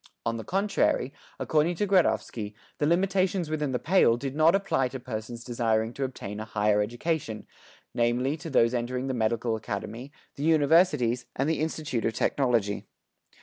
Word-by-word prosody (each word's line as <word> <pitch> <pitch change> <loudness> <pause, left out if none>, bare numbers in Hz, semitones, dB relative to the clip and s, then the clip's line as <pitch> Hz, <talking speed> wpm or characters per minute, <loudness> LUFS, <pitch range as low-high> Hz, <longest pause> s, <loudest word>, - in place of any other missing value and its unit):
On 115 0 -1
the 110 - -6
contrary, 195 - 0 0.2
according 160 +3 +1
to 205 - 0
Gradovsky, 125 - +1 0.2
the 150 - +2
limitations 185 -1 +1
within 150 -3 -1
the 125 - 0
"Pale" 155 -7 +3
did 135 +2 -5
not 160 +4 +5
apply 195 -9 +1
to 130 +1 -7
persons 115 0 -6
desiring 115 -2 0
to 140 - -3
obtain 105 -6 -5
a 110 - -5
higher 105 -1 +1
education, 120 0 -3 0.5
namely 120 +4 +1
to 165 +1 -7
those 115 -4 +3
entering 125 +1 -2
the 135 - -2
medical 115 0 0
academy, 110 +4 -6 0.3
the 140 - -4
universities, 150 -6 +3
and 135 - 0
the 160 -2 0
Institute 155 -6 -2
of 110 - 0
Technology. 115 -7 0
130 Hz, 160 wpm, -27 LUFS, 115-155 Hz, 0.5 s, not